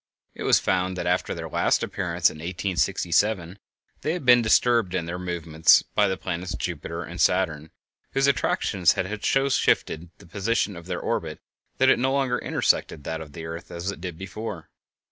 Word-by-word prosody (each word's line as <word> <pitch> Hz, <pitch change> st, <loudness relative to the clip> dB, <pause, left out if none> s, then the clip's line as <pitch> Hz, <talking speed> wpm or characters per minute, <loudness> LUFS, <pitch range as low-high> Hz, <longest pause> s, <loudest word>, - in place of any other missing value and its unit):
It -, -, -11 dB
was -, -, +5 dB
found 95 Hz, 0 st, 0 dB
that 85 Hz, -, -3 dB
after 90 Hz, +1 st, 0 dB
their -, -, -5 dB
last -, -, +1 dB
appearance, -, -, 0 dB
in -, -, -11 dB
1867, 90 Hz, +1 st, 0 dB, 0.4 s
they 155 Hz, -, -1 dB
had 175 Hz, -6 st, -5 dB
been 125 Hz, -1 st, +7 dB
disturbed 115 Hz, -4 st, +3 dB
in 85 Hz, -2 st, -1 dB
their 85 Hz, +2 st, -5 dB
movements 85 Hz, -3 st, +3 dB
by 105 Hz, -1 st, +3 dB
the 95 Hz, -1 st, -1 dB
planets 90 Hz, +1 st, -4 dB
Jupiter 85 Hz, 0 st, -4 dB
and 85 Hz, +2 st, -6 dB
Saturn, 80 Hz, -4 st, +1 dB, 0.4 s
whose 135 Hz, 0 st, +2 dB
attractions 100 Hz, -, +2 dB
had 100 Hz, +3 st, -4 dB
so 135 Hz, 0 st, +2 dB
shifted 85 Hz, -10 st, +1 dB
the -, -, -16 dB
position 100 Hz, +3 st, -1 dB
of 85 Hz, 0 st, -10 dB
their -, -, -3 dB
orbit -, -, -3 dB, 0.4 s
that -, -, +4 dB
it -, -, +4 dB
no 130 Hz, +2 st, +1 dB
longer 135 Hz, -3 st, +1 dB
intersected 75 Hz, -, 0 dB
that 80 Hz, +2 st, -4 dB
of 75 Hz, -3 st, -10 dB
the 80 Hz, 0 st, -7 dB
earth, 85 Hz, +1 st, -7 dB
as 85 Hz, +3 st, -4 dB
it 100 Hz, -, -10 dB
did 90 Hz, -3 st, -6 dB
before. 95 Hz, -2 st, -7 dB
90 Hz, 185 wpm, -25 LUFS, 85-105 Hz, 0.4 s, been